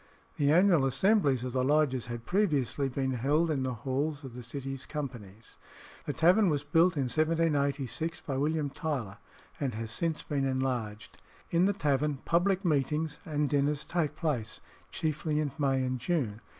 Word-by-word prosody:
The 145 0 +3
annual 175 -2 +5
assemblies 140 - +2
of 125 -1 -4
the 130 -1 +1
lodges 140 -3 +2
had 120 -1 -6
previously 145 - +1
been 130 0 -1
held 145 +7 +1
in 140 -3 0
the 130 -1 -2
halls 145 +3 -1
of 130 -3 -8
the 125 - -7
City's 135 +2 -6
companies. 115 -8 -7 0.5
The - - -1
tavern 180 +6 +4
was 145 -2 0
built 165 +4 +3
in 140 - +2
1786, 155 +1 0
by 135 - -4
William 150 +1 0
Tyler, 125 -11 -4 0.4
and 135 -6 -2
has 110 0 -4
since 160 +6 -1
been 140 -3 -1
enlarged. 130 -5 -2 0.3
In 170 +2 +4
the 200 - +2
tavern 145 -4 0
public 185 +3 +2
meetings 150 0 0
and 150 -3 0
dinners 145 +1 0
take 155 -4 -1
place, 135 -10 -2 0.3
chiefly 155 -1 -1
in 150 -2 -1
May 135 -2 +2
and 130 0 -2
June. 120 -7 -1
145 Hz, 165 wpm, -30 LUFS, 130-160 Hz, 0.5 s, annual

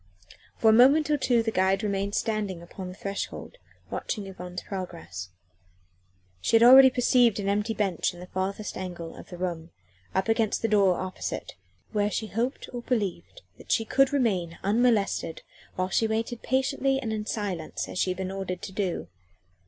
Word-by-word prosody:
For 220 - +5
a - - +5
moment 280 +6 +6
or 295 - +3
two 240 -4 +2
the 225 - -1
guide 190 +1 +2
remained 200 0 -1
standing 200 -6 -2
on 190 -2 -5
the 180 - -8
threshold, 200 - -5 0.3
watching 210 -4 -3
Yvonne's 180 -2 -7
progress. 90 - -6 1.1
She 225 - +2
had 225 - +6
already 265 +2 +10
perceived 245 -3 +3
an 200 - -3
empty 210 +3 0
bench 195 -5 0
in 175 - -13
the 180 - -8
furthest 190 +3 -3
angle 175 -3 -6
of - - -12
the 180 - -8
room, 170 -2 -4 0.5
up 190 +2 +1
against 225 -1 +1
the - - +3
door 200 -4 +4
opposite, 185 +1 -5 0.4
where 205 0 +1
she 220 - -2
hoped 235 +5 -2
or 245 - -4
believed 235 - -3 0.2
that - - -8
she 225 - +2
could 270 +3 +3
remain 190 - 0
unmolested 205 -6 +1 0.3
while 185 0 -1
she 225 - +2
waited 225 +2 -2
patiently 270 +1 +1
and 225 -5 -3
in 210 -1 -4
silence 190 -7 -3
as - - -5
she - - +2
had 185 - -2
been 190 0 -3
ordered 190 -2 -4
to 195 - -5
do. 190 - -2
205 Hz, 175 wpm, -27 LUFS, 185-230 Hz, 1.1 s, already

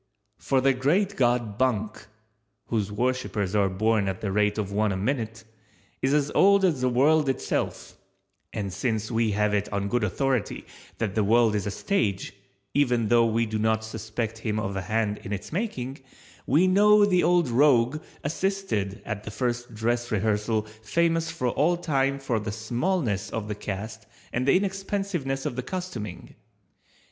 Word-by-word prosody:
For 135 -1 +1
the 135 +1 +4
Great 180 +11 +1
God 120 -4 +1
Bunk 110 -5 -1 0.6
(whose 105 -3 -1
worshipers 110 -4 -1
are 100 -2 +3
born 105 +1 +1
at 95 -1 -2
the 100 - -3
rate 105 +1 +1
of 100 -2 -2
one 105 +1 +1
a 95 - -2
minute) 115 0 -2 0.6
is 135 - +1
as 145 0 +2
old 200 0 +5
as 155 -8 +1
the 130 - +2
world 145 +4 +3
itself; 130 - -2 0.6
and 100 -3 -4
since 110 -1 -2
we 115 -2 +1
have 105 0 +1
it 105 0 -1
on 100 0 -1
good 120 0 +1
authority 125 +4 -1 0.3
that 110 -4 -2
the 110 - +1
world 115 +1 +4
is 105 -1 -1
a - - 0
stage, 100 - -1 0.4
even 120 -6 +2
though 115 -1 +5
we 115 +1 +1
do 110 0 -3
not 110 0 +1
suspect 110 0 -4
him 110 -1 -2
of 100 -2 -3
a 95 - -2
hand 105 +2 -1
in 95 - -8
its 100 +7 -5
making, 140 - -3 0.5
we 155 +7 +4
know 205 +2 +6
the 180 -3 +3
old 175 -3 +3
rogue 130 +2 +3 0.2
assisted 155 - -2
at 105 -2 -4
the - - -6
first 120 +1 -3
dress 120 +2 -1
rehearsal 105 +1 0 0.2
famous 165 +7 +1
for 145 -6 -1
all 165 +8 +2
time 140 -5 0
for 135 -5 -1
the 105 0 -4
smallness 120 - -1
of 110 -2 -4
the 105 - -2
cast 110 +2 -6 0.3
and 125 +2 -1
the 140 - +6
inexpensiveness 195 -8 -2
of - - -2
the 125 - -2
costuming. 130 - -6
115 Hz, 170 wpm, -26 LUFS, 105-140 Hz, 0.6 s, know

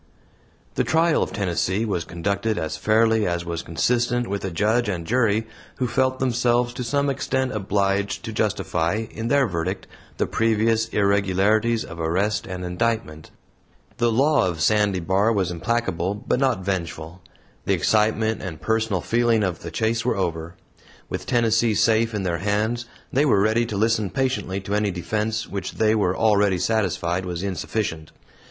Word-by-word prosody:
The - - +1
trial 165 0 +2
of - - -1
Tennessee 95 +2 -1
was 90 -6 -2
conducted 100 +5 -2
as 80 - -2
fairly 110 0 +2
as 85 -1 -2
was 85 -1 -3
consistent 120 +9 0
with 100 0 -3
a 95 - -2
judge 105 +6 +1
and 85 -4 -3
jury 110 0 +1 0.3
who 130 - -1
felt 130 +2 +1
themselves 120 -1 +1
to 125 0 -4
some 140 +4 0
extent 130 -1 -1
obliged 100 -1 -1
to - - -5
justify, 90 +7 -1
in 115 +1 -4
their 140 +1 +3
verdict, 90 -1 -3 0.3
the - - +1
previous 115 0 +1
irregularities 100 +2 +2
of 85 - -9
arrest 95 +6 0
and 90 -1 -5
indictment. 90 -4 -2 0.7
The 120 0 +2
law 140 0 +3
of 85 -3 -3
Sandy 105 +3 +2
Bar 95 +6 +2
was 95 -4 0
implacable, 95 -1 -1
but 120 +4 -1
not 125 -9 +1
vengeful. 85 -2 -4 0.4
The - - +2
excitement 110 +1 +1
and 85 -5 -6
personal 110 +1 0
feeling 115 0 +2
of 90 -4 -2
the - - -7
chase 115 0 0
were 125 -3 0
over; 85 -2 -3 0.5
with - - -5
Tennessee 115 -1 +2
safe 115 +1 +2
in 100 - -2
their 85 -2 -1
hands 105 +5 -1 0.3
they 140 - +3
were 130 -9 +3
ready 110 +3 +2
to 105 -4 -4
listen 110 -1 +1
patiently 125 -4 -1
to 100 +2 -5
any 105 0 +1
defense, 105 +5 -2
which 100 -1 -5
they 110 -1 +2
were 100 -4 +1
already 105 -3 +3
satisfied 90 -3 0
was 90 -1 -4
insufficient. 90 -4 -3
105 Hz, 160 wpm, -23 LUFS, 95-115 Hz, 0.7 s, their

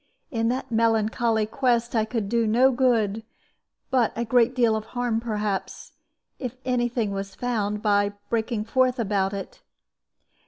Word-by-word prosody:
In 230 -2 0
that 260 +1 -3
melancholy 225 0 +2
quest 240 0 0
I 220 -1 +2
could 220 -2 -3
do 230 +1 +1
no 250 +5 +4
good, 230 -5 +1 0.7
but 250 -4 +3
a 235 - -2
great 245 +1 +3
deal 235 -3 +3
of 215 0 -3
harm, 240 -2 0
perhaps, 210 -4 -3 0.5
if 250 -1 -5
any 245 -2 +1
thing 230 -4 -1
was 195 0 -5
found, 210 -4 -2
by 205 -1 +2
breaking 225 -1 -1
forth 255 +2 +2
about 200 -4 0
it. 200 - -7
230 Hz, 150 wpm, -25 LUFS, 210-245 Hz, 0.7 s, no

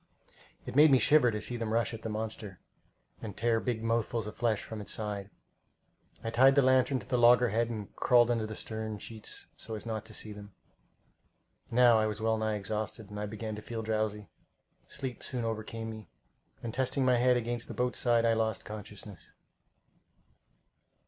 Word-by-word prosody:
It - - -6
made 150 +2 +8
me 135 - +6
shiver 145 -1 +5
to 105 -2 -2
see 120 - -3
them 115 -2 -3
rush 115 +1 +1
at 115 - -7
the 110 - -4
monster, 105 -3 -5 0.6
and 105 -3 -7
tear 115 0 +2
big 115 -2 -2
mouthfuls 115 -1 0
of 105 - -7
flesh 115 -3 0
from 110 -2 -7
its 100 - -6
side. 105 -2 -3 0.9
I 115 - -2
tied 135 +3 +6
the 140 - +5
lantern 130 +1 +4
to 100 - -13
the 125 -2 +1
loggerhead 120 -1 +5
and 105 -4 -6
crawled 120 -1 +4
under 115 -2 0
the 110 - -6
stern 110 0 -4
sheets 110 +1 -7
so 110 - -6
as 105 - -7
not 110 -2 -3
to - - -9
see 105 - -4
them. 105 -1 -12 1.1
Now 120 -1 +6
I 110 - +2
was 105 0 -4
well 110 0 +1
nigh 110 -1 0
exhausted, 105 +1 -4
and 105 0 -4
began 110 0 -5
to - - -7
feel 115 0 -5
drowsy. 110 -1 -1 0.6
Sleep 130 -3 -5
soon 125 -2 -3
overcame 115 0 -4
me, 110 -1 -10 0.5
and 115 -2 -4
testing 130 +1 0
my 125 -1 +4
head 125 +1 +4
against 120 0 -3
the - - -7
boat's 125 0 0
side, 120 -1 +3
I 115 - +4
lost 110 -1 -1
consciousness. 105 -2 -9
115 Hz, 185 wpm, -31 LUFS, 110-120 Hz, 1.1 s, made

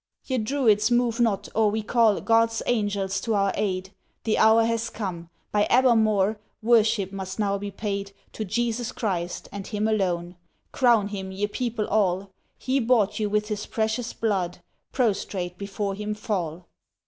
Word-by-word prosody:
Ye 260 -2 -1
Druids 220 -3 +2
move 240 -1 +1
not, 205 -4 +1
or 220 -1 +3
we 215 +1 -2
call 225 -2 +3
God's 230 0 +2
Angels 200 -4 0
to 225 -2 0
our 200 -1 +2
aid. 190 -2 -2 0.3
The 220 - +1
hour 220 +1 +6
has 230 0 0
come. 175 -5 -5 0.2
By 205 0 +2
Abermawr 220 -5 +4 0.3
Worship 220 -4 +3
must 190 -1 -6
now 200 -2 0
be 205 0 -4
paid 200 0 -4 0.2
To 220 - -4
Jesus 235 +3 -1
Christ, 180 -7 -3
and 200 -1 -6
Him 210 0 -1
alone, 180 -5 -1 0.3
Crown 235 -6 +3
Him 190 -2 -5
ye 195 +2 -1
people 225 0 -2
all; 195 -2 +1 0.3
He 265 +1 0
bought 225 -4 +2
you 210 -1 0
with 210 +1 0
His 210 -1 -3
Precious 220 +2 -1
Blood, 190 -6 -2 0.3
Prostrate 195 -7 -1
before 200 0 -3
Him 210 +1 -4
fall!" 180 -6 -3
210 Hz, 160 wpm, -25 LUFS, 195-225 Hz, 0.3 s, hour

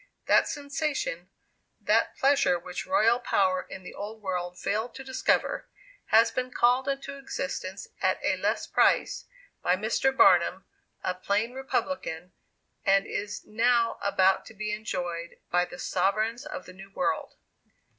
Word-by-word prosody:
That - - +4
sensation 285 - -3 0.5
that - - +1
pleasure 275 -9 +3
which 180 +1 -6
royal 240 -4 +4
power 185 -6 +2
in 190 - -8
the - - -9
old 215 +2 -7
world 180 -3 -3
failed 220 +4 -2
to 270 - -7
discover 265 - 0 0.4
has 225 +1 +5
been 255 0 -2
called 250 +2 +3
into 275 0 -3
existence 205 -8 -5
at - - +2
a - - +2
less - - -1
price, - - +2 0.4
by 180 - +3
Mr. 220 +7 +1
Barnum, 185 -6 +4 0.4
a 185 - 0
plain 200 +6 -1
republican, 260 -9 -3 0.5
and 195 0 +4
is 210 +1 -4
now 230 +1 +2
about 190 -1 +3
to 220 - -13
be 210 +1 -3
enjoyed 175 -5 -4
by 180 0 +3
the 175 - -11
sovereigns 215 +10 0
of 295 -2 -6
the 185 - -11
new 195 +1 -12
world. 235 +8 -2
215 Hz, 145 wpm, -28 LUFS, 185-260 Hz, 0.5 s, has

